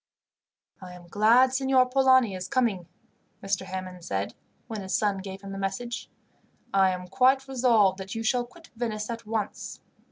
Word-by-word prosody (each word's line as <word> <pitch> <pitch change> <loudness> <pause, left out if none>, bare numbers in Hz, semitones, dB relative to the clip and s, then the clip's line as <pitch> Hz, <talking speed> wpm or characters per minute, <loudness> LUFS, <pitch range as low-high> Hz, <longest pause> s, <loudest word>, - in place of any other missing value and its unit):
"I 180 -1 -9
am 175 -1 -13
glad 235 +7 +4
Signor 265 -1 +3
Polani 260 -4 +4
is 185 -1 -5
coming," 225 -10 0 0.6
Mr. 195 0 -2
Hammond 185 -1 -6
said, 100 -7 -3 0.3
when 220 -3 -6
his 190 -1 -2
son 205 -2 +1
gave 190 0 -8
him 195 - -7
the 195 - -6
message. 195 +5 -4 0.6
"I 195 -1 +5
am 180 0 -4
quite 265 +3 +3
resolved 230 -7 +3
that 195 +3 -6
you 225 - -3
shall 240 +2 +1
quit 330 +7 -18
Venice 220 -2 -3
at 230 -1 -7
once. 215 -2 -4
215 Hz, 165 wpm, -27 LUFS, 190-250 Hz, 0.6 s, I